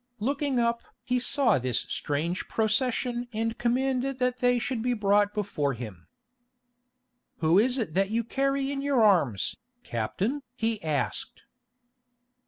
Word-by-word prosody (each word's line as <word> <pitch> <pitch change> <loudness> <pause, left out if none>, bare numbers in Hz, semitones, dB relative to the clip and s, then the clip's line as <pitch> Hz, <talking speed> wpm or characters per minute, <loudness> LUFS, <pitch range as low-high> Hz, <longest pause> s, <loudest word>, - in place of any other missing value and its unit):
Looking 275 +3 0
up 235 0 +1 0.2
he 250 0 0
saw 255 - +2
this 125 -1 0
strange 160 +5 -2
procession 240 +2 0
and 225 +1 -1
commanded 255 +2 0
that 250 0 0
they 245 0 +3
should 245 0 -2
be 245 +1 0
brought 205 -1 +3
before 170 -10 -1
him. 105 -8 -9 1.3
"Who 165 +3 +4
is 250 +4 +3
it 220 -11 -2
that 195 +2 +2
you 230 +2 0
carry 275 +3 0
in 275 -1 -3
your 275 -4 +2
arms, 165 - +3 0.3
captain?" 190 - -2
he 225 -3 -1
asked. 155 -3 -3
230 Hz, 135 wpm, -27 LUFS, 185-250 Hz, 1.3 s, Who